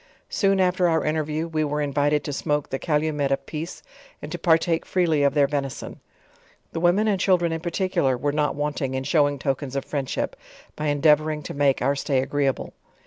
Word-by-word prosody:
Soon 195 -1 +2
after 180 -1 +3
our 160 -1 +1
interview, 155 +1 -1
we 155 -2 -1
were 150 0 -1
in 145 -2 -2
vited 145 +1 +2
t,o - - -4
smoke 145 0 -1
the 135 - -2
calumet 150 -3 0
of 135 0 -1
peace, 160 +3 -6 0.4
and - - -8
to - - -4
partake 165 -1 +2
freely 170 -5 +1
of 140 0 +2
their 145 -1 +5
venison. 140 -2 -4 0.7
The - - -3
women 180 +6 +3
and 200 -3 +1
children 180 -3 +2
in 165 0 -3
particular, 170 -7 0
wer,e 145 +3 -1
not 150 -1 +1
wanting 145 -2 -2
in 130 - -2
showing 145 0 +2
tokens 135 0 -3
of 135 - -2
friendship, 140 -3 -3 0.4
by 155 - -3
endeavoring 150 +1 +2
to - - -6
make 140 -2 +2
our 140 +2 +2
stay 135 -1 0
agreeable. 135 0 -1
150 Hz, 195 wpm, -24 LUFS, 140-165 Hz, 0.7 s, their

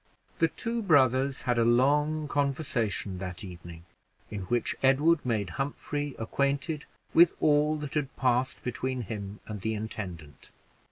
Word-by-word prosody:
The 165 - +5
two 230 +7 -3
brothers 135 - +3
had 120 -1 +1
a - - +4
long 145 +6 +3
conversation 135 - -1
that 90 -1 -6
evening, 85 -3 -10 0.5
in 100 -3 -4
which 120 +5 0
Edward 145 +4 +4
made 110 -7 -1
Humphrey 145 0 -3
acquainted 140 +6 -1 0.3
with 170 0 +6
all 150 0 +3
that 150 -2 -6
had 145 -3 -2
passed 125 0 +1
between 130 +1 -2
him 105 -2 -6
and 105 -3 -6
the 110 +2 -1
intendant. 90 -8 -7
130 Hz, 135 wpm, -29 LUFS, 105-145 Hz, 0.5 s, with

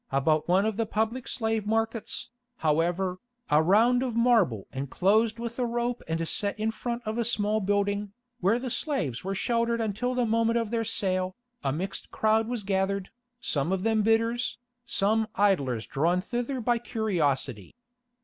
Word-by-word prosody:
About 150 +3 +2
one 185 +3 +3
of 220 -2 -1
the 225 -1 0
public 220 +4 -1
slave 220 -3 -1
markets, 225 +1 -1 0.3
however, 175 +4 +1 0.3
a 150 +1 +6
round 225 +9 +4
of 250 -3 -2
marble 225 - +3
enclosed 200 - +1
with 235 +1 -5
a 250 - +2
rope 240 +1 -1
and 165 0 -1
set 205 +3 -1
in 220 +1 +1
front 235 +1 -4
of 220 +2 -2
a - - +2
small 215 -1 +1
building, 205 +1 0 0.3
where 205 +3 +3
the 250 0 -4
slaves 180 - -2
were 195 +1 -2
sheltered 235 +3 0
until 225 +3 -1
the 250 -1 +2
moment 230 +1 +2
of 230 -2 -1
their 230 -1 0
sale, 185 -2 0 0.3
a 135 - +1
mixed 175 +7 -4
crowd 220 +1 +2
was 240 -3 -3
gathered, 195 0 -1 0.3
some 150 - -1
of 190 -1 0
them 220 -1 +2
bidders, 230 +2 +1 0.3
some 220 +2 +1
idlers 140 - +2
drawn 170 +6 +1
thither 245 +6 -3
by 240 0 +1
curiosity. 160 - -1
215 Hz, 165 wpm, -28 LUFS, 185-230 Hz, 0.3 s, a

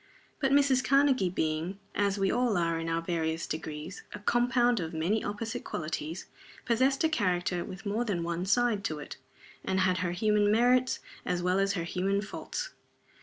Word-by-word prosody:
But 270 -2 +1
Mrs. 275 -2 +4
Karnegie 275 -8 +3
being 160 +2 -2 0.2
as 200 -1 +1
we 195 -1 +2
all 245 -4 +2
are 165 -1 +1
in 165 0 -3
our 165 0 -1
various 165 -1 -1
degrees 155 +3 -5
a - - -5
compound 240 +2 +2
of 165 -1 -4
many 180 +8 0
opposite 225 +3 -4
qualities, 155 +2 -4 0.4
possessed 260 +4 +2
a - - +5
character 180 - 0
with 190 +3 -9
more 210 +4 0
than 195 -7 -1
one 170 +2 -2
side 230 -1 +2
to 155 - -1
it, 150 - -8 0.5
and 190 0 0
had 185 0 +2
her 180 -1 0
human 210 +2 +2
merits 250 +3 +3 0.2
as 175 -1 -1
well 180 +2 +2
as 195 0 +2
her 175 -4 -2
human 190 +4 0
faults. - - -5
195 Hz, 175 wpm, -30 LUFS, 170-240 Hz, 0.5 s, a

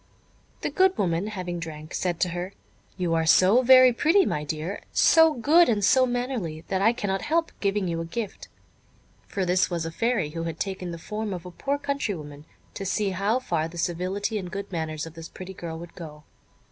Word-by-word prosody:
The - - -2
good 380 0 +3
woman 175 0 0
having 180 -4 -4
drank, 155 -2 -8
said 175 -2 -1
to 180 - +2
her: 175 +3 -5 0.4
"You 175 -3 0
are 160 -1 +1
so 190 +8 +6
very 255 0 +7
pretty, 335 +10 +4
my 150 - -1
dear, 155 +6 -4
so 320 -2 +5
good 310 +7 +5
and 205 -3 +2
so 260 +3 +5
mannerly, 245 -10 -3
that 190 -1 0
I 220 +3 +5
cannot 200 -5 -2
help 330 +2 0
giving 200 -1 0
you 165 -1 -2
a - - -4
gift" 205 +4 -5 0.8
(for 195 -2 -2
this 180 +1 +2
was 170 -2 -2
a 165 - -4
Fairy, 225 -5 0
who 165 +1 -4
had 165 -1 -5
taken 190 -2 -3
the 170 - -5
form 210 +3 -4
of 175 - -9
a 180 - -8
poor 280 +10 -2
country 280 -7 -2
woman, 145 -2 -10 0.3
to - - -6
see 195 +1 0
how 200 +5 +1
far 170 -11 -1
the 170 +1 -11
civility 185 +6 -2
and 180 -2 -6
good 200 +2 -6
manners 160 -3 -3
of 165 - -10
this 165 0 -9
pretty 190 +1 -9
girl 165 -3 -6
would 170 +1 -10
go). 150 -3 -10
185 Hz, 210 wpm, -26 LUFS, 165-225 Hz, 0.8 s, very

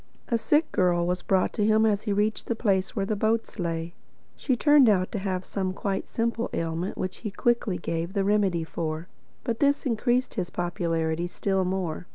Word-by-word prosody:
A 235 - +2
sick 300 +7 +2
girl 175 -2 +2
was 180 +1 -1
brought 190 -1 +1
to 210 - 0
him 220 +1 +4
as 210 -2 +2
he 215 - -2
reached 210 +2 0
the 235 - 0
place 190 -4 0
where 195 - 0
the 215 - -1
boats 220 +1 -1
lay. 165 -1 -2 0.4
She 260 - 0
turned 290 -1 +6
out 185 -3 +2
to 210 - -2
have 185 -1 -2
some 190 -2 -2
quite 195 -1 -2
simple 235 0 -1
ailment 165 +3 -2
which 185 - -3
he 215 - -5
quickly 220 -2 0
gave 165 +2 -3
the 200 -2 +1
remedy 195 -4 +2
for. 160 0 -4 0.4
But 235 -3 -2
this 285 0 +2
increased 245 +1 +1
his 180 -5 -3
popularity 170 -1 -1
still 190 +1 0
more. 180 -2 -3
195 Hz, 195 wpm, -26 LUFS, 175-220 Hz, 0.4 s, turned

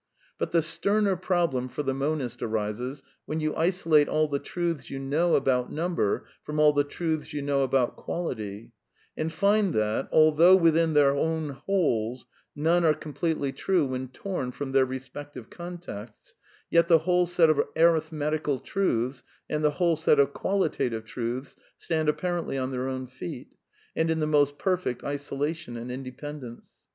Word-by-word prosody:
But - - -1
the 165 -2 +3
sterner 200 +5 +1
problem 170 -8 0
for 150 - -4
the 135 -1 0
monist 135 -3 -2
arises 115 +5 -3 0.2
when 155 - -2
you 155 -1 -1
isolate 165 -3 +3
all 155 0 +2
the 140 -1 -1
truths 170 -5 -3
you 135 - -5
know 150 +6 +1
about 125 -2 +1
number 165 - -1 0.2
from 150 0 -4
all 150 -1 +6
the 145 0 +3
truths 155 +1 -3
you 145 -1 -3
know 140 -1 +1
about 130 -2 +1
quality, 110 - -5 0.4
and 160 +1 -2
find 200 +2 +2
that, 110 +4 0
although 155 +4 +6
within 165 -2 +3
their 145 -2 +6
own 160 +2 -1
wholes 130 - -1 0.3
none 165 +4 +2
are 155 -2 +4
completely 150 -1 -2
true 180 +1 +1
when 130 0 -3
torn 130 -1 -4
from 135 +1 -5
their 135 0 +4
respective 130 -1 -8
contexts, 175 - -9 0.4
yet 170 0 +4
the 165 - +7
whole 180 -1 +3
set 170 -2 +4
of 150 - +3 0.2
arithmetical 155 -3 +2
truths, 130 - -1 0.3
and 150 0 -2
the 150 - +5
whole 175 -2 +3
set 155 -2 +3
of 140 0 +3
qualitative 140 - -1
truths 120 +4 -4 0.2
stand 160 -2 0
apparently 170 -1 -1
on 130 0 -2
their 130 0 -2
own 130 -1 -3
feet, 125 -8 -8 0.5
and 160 0 +1
in 160 0 +1
the 155 - +1
most 145 -1 +2
perfect 185 -9 -1
isolation 145 -1 -3
and 120 +2 -6
independence. 130 -1 -8
150 Hz, 160 wpm, -27 LUFS, 130-165 Hz, 0.5 s, the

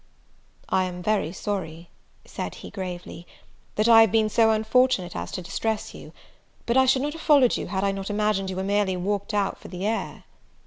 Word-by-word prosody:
"I 185 0 +1
am 180 -1 -6
very 205 -5 0
sorry," 170 -4 -5 0.3
said - - -6
he, - - -10
gravely, 180 -2 -7 0.5
"that 215 +2 +2
I 225 -1 +8
have 225 -4 +4
been 220 -1 +2
so 225 +1 +4
unfortunate 220 -4 +2
as - - -5
to 185 - -4
distress 220 +5 -3
you; - - -11 0.5
but 235 - 0
I 260 0 +5
should 260 +1 +3
not 295 +1 -2
have 325 - -9
followed 280 -6 +4
you - - -4
had 190 +1 -2
I 200 - +2
not 195 0 -5
imagined 205 -2 0
you 190 - -4
were 190 - -2
merely 200 -1 0
walked 200 +3 -2
out 205 -2 -1
for - - -11
the 180 +1 -5
air." 225 +1 -3
205 Hz, 200 wpm, -25 LUFS, 185-225 Hz, 0.5 s, I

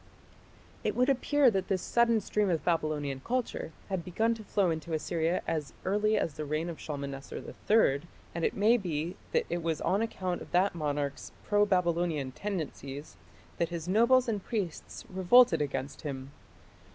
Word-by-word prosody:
It - - 0
would 250 +2 +3
appear 275 0 +4
that 190 -3 -1
this 185 -2 0
sudden 235 -2 +3
stream 205 0 0
of 165 -3 0
Babylonian 155 -5 0
culture 250 -9 -2 0.2
had 190 -4 -2
begun 220 +7 +1
to 225 -1 -8
flow 195 -3 +1
into 160 +1 -4
Assyria 165 +2 0
as 155 -4 -2
early 210 +3 +2
as 165 - 0
the 155 - -5
reign 155 +3 -2
of 165 - -7
Shalmaneser 140 -2 -5 0.3
III, 175 -11 +5 0.3
and 170 - -3
it - - +1
may 220 +4 +4
be 170 -4 -3 0.2
that - - +2
it 175 0 -2
was 165 -1 -1
on 195 +3 +1
account 185 -5 -2
of - - -9
that 185 +3 +3
monarch's 145 -3 -3
pro 205 0 +3
Babylonian 170 -7 +1
tendencies 150 -6 -5 0.4
that 170 - +1
his 170 -1 -5
nobles 235 +6 +4
and 210 -4 -1
priests 200 -8 -4
revolted 190 +4 +5
against 140 -1 -3
him. 135 -2 -5
175 Hz, 165 wpm, -30 LUFS, 155-210 Hz, 0.4 s, III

